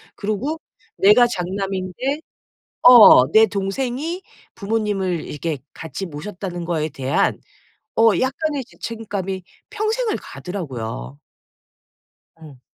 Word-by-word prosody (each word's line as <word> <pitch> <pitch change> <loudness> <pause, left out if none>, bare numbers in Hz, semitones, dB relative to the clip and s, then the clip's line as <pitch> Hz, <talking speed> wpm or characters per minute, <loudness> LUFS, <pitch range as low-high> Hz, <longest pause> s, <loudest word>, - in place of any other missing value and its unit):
그리고 215 +10 -3 0.4
내가 210 +5 +6
장남인데 195 - -3 0.7
어 235 - +9
내 220 0 +7
동생이 250 - -3 0.3
부모님을 200 -5 -1
이렇게 150 0 -4 0.2
같이 165 +4 -6
모셨다는 175 +2 -6
거에 160 -2 -1
대한 135 0 0 0.6
어 225 0 +6
약간의 280 +2 -1
죄책감이 200 -6 -5 0.3
평생을 435 +2 -1
가더라고요. 115 - -6 1.2
음. 150 -5 -13
200 Hz, 225 characters per minute, -21 LUFS, 175-245 Hz, 1.2 s, 어